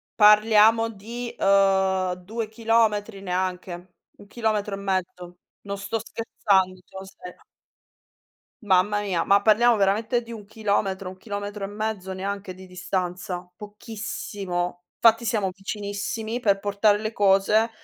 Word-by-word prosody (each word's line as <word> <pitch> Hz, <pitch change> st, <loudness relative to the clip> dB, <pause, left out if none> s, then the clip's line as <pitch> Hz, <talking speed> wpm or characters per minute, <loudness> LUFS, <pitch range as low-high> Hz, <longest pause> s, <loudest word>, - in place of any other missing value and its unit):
parliamo 215 Hz, +1 st, +6 dB
di, 230 Hz, +4 st, -7 dB
uhm, 190 Hz, -2 st, +3 dB
2 215 Hz, +5 st, -5 dB
chilometri 220 Hz, -2 st, +1 dB
neanche, 180 Hz, -1 st, -4 dB, 0.3 s
1 205 Hz, -, -14 dB
chilometro 215 Hz, -2 st, -1 dB
e -, -, -8 dB
mezzo. 180 Hz, -2 st, -3 dB, 0.2 s
Non 200 Hz, 0 st, -5 dB
sto 205 Hz, +3 st, -3 dB
scherzando, 190 Hz, -5 st, 0 dB
sono 190 Hz, +1 st, -10 dB
sera. 180 Hz, -2 st, -13 dB, 1.2 s
Mamma 205 Hz, +1 st, +2 dB
mia, 185 Hz, -4 st, -1 dB
ma 200 Hz, 0 st, +4 dB
parliamo 225 Hz, +2 st, +5 dB
veramente 215 Hz, +5 st, +1 dB
di 230 Hz, 0 st, -10 dB
1 210 Hz, -3 st, -9 dB
chilometro, 200 Hz, -3 st, -1 dB
1 185 Hz, -, -13 dB
chilometro 205 Hz, 0 st, -5 dB
e -, -, -1 dB
mezzo, 205 Hz, -2 st, -4 dB
neanche, 195 Hz, 0 st, -5 dB
di 190 Hz, 0 st, -13 dB
distanza. 180 Hz, 0 st, -4 dB
Pochissimo, 200 Hz, -4 st, -5 dB
fatti 230 Hz, 0 st, +4 dB
siamo 210 Hz, -5 st, 0 dB
vicinissimi 210 Hz, +3 st, -4 dB
per 200 Hz, -4 st, +2 dB
portare 205 Hz, +1 st, +2 dB
le 215 Hz, +1 st, -4 dB
cose, 205 Hz, +3 st, +3 dB
200 Hz, 130 wpm, -24 LUFS, 190-220 Hz, 1.2 s, parliamo